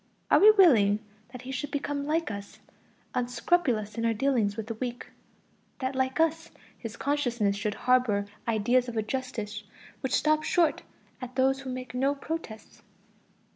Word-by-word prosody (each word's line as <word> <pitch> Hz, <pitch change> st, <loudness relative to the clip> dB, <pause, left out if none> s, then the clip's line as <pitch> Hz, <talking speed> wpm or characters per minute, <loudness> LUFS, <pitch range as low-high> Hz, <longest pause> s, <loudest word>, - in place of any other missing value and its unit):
Are -, -, +7 dB
we 420 Hz, -, +8 dB
willing 255 Hz, -, +6 dB, 0.3 s
that 250 Hz, -1 st, -9 dB
he 260 Hz, -, -6 dB
should 270 Hz, +3 st, -3 dB
become 285 Hz, 0 st, -3 dB
like 320 Hz, -3 st, 0 dB
us, 200 Hz, 0 st, -8 dB, 0.6 s
unscrupulous 245 Hz, -3 st, 0 dB
in -, -, -1 dB
our 230 Hz, -1 st, +1 dB
dealings 225 Hz, -4 st, +1 dB
with 220 Hz, -, -4 dB
the 230 Hz, -, -4 dB
weak? 245 Hz, +2 st, -5 dB, 0.7 s
that 260 Hz, 0 st, -3 dB
like 260 Hz, +2 st, -1 dB
us, 325 Hz, 0 st, +1 dB, 0.3 s
his 230 Hz, -1 st, -8 dB
consciousness 245 Hz, -8 st, 0 dB
should 205 Hz, +1 st, -2 dB
harbor 250 Hz, -5 st, +2 dB, 0.2 s
ideas 240 Hz, +3 st, +2 dB
of 230 Hz, -, -6 dB
a 220 Hz, -, +1 dB
justice 220 Hz, -4 st, -4 dB, 0.4 s
which 265 Hz, -, -1 dB
stops 310 Hz, 0 st, +2 dB
short 340 Hz, -3 st, +2 dB, 0.4 s
at 250 Hz, 0 st, -7 dB
those 265 Hz, +1 st, +2 dB
who 270 Hz, -1 st, -7 dB
make 255 Hz, 0 st, -6 dB
no 270 Hz, +3 st, +1 dB
protests? 285 Hz, -7 st, -7 dB
255 Hz, 160 wpm, -28 LUFS, 220-280 Hz, 0.7 s, we